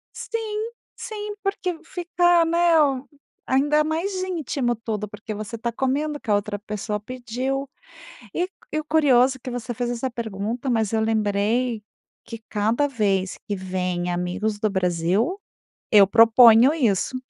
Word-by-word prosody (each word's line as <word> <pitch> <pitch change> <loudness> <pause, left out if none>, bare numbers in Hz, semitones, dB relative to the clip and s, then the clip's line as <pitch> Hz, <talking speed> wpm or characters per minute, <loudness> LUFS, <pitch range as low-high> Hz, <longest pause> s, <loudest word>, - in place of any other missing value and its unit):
Sim, 440 0 -4 0.3
sim, 420 -2 -6
porque 390 -3 -2
v 320 - -15
fica 350 -1 +2
né, 335 0 +3
m 275 -2 +1 0.4
ainda 290 +3 +3
mais 330 +6 -2
íntimo 290 -9 -1
tudo 215 -2 -4
porque 210 +1 -7
você 215 +2 -6
tá 235 +1 -3
comendo 290 +4 -1
o - - -26
que 215 - -6
a - - +5
outra 205 0 -1
pessoa 210 0 -4
pediu, 255 +4 -4 0.7
e 355 +1 0 0.2
e 310 - 0
o - - -5
curioso 270 -4 +3
que 255 - -7
você 245 0 -5
fez 240 +1 -2
essa 245 +2 -2
pergunta, 230 +1 -4
mas 225 -4 0
eu 220 - +2
lembrei 220 +2 0 0.4
que 230 - -8
cada 225 +7 +1
vez 200 -7 0
que 205 - -1
vêm 180 -2 -2
amigos 180 +5 -2
do 215 - 0
Brasil, 190 - 0 0.5
eu 205 -2 +7
proponho 230 +4 +7
isso. 245 - 0
240 Hz, 155 wpm, -23 LUFS, 210-295 Hz, 0.7 s, eu